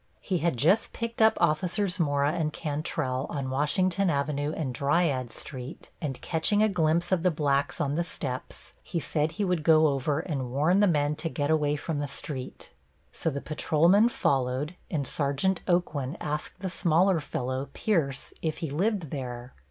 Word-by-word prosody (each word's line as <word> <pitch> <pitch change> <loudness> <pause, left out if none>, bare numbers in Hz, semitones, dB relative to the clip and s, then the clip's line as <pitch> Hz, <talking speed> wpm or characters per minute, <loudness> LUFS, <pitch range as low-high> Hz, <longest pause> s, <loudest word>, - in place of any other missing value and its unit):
He 185 -3 -1
had 165 -5 0
just 180 - +3
picked 230 0 -3
up 220 0 +5
Officers 175 +4 +1
Mora 145 -2 +2
and 160 -2 -1
Cantrell, 145 -3 -2
on 135 -2 -3
Washington 185 +7 +1
Avenue 145 0 0
and 135 -6 -2
Dryades 140 -3 +1
Street, 130 +1 -8
and 140 -5 -3
catching 205 +6 +2
a 215 - +4
glimpse 170 -2 +1
of 185 -3 +3
the 180 - +3
blacks 145 -3 0
on 140 -1 0
the 170 +3 +1
steps, 130 -6 -6
he 170 - -3
said 155 0 -1
he 200 +4 -1
would 180 -3 0
go 155 0 +5
over 140 +1 0
and 135 -7 -3
warn 155 +9 +2
the 205 - +5
men 150 -3 +2
to 165 - -2
get 145 -1 -1
away 150 -2 +2
from 150 0 -3
the 145 - -2
street. 140 -1 -6 0.4
So - - -2
the 140 -2 -4
patrolmen 170 +8 +3
followed, 135 - 0 0.2
and 145 -4 -1
Sergeant 145 +8 0
Aucoin 160 -6 0
asked 150 +3 -4
the 190 - -2
smaller 175 +2 +3
fellow, 130 -1 -3
Pierce, 150 -10 -1
if 160 -2 -2
he 160 -4 -4
lived 185 0 0
there. 125 -3 -5
155 Hz, 175 wpm, -28 LUFS, 140-175 Hz, 0.4 s, up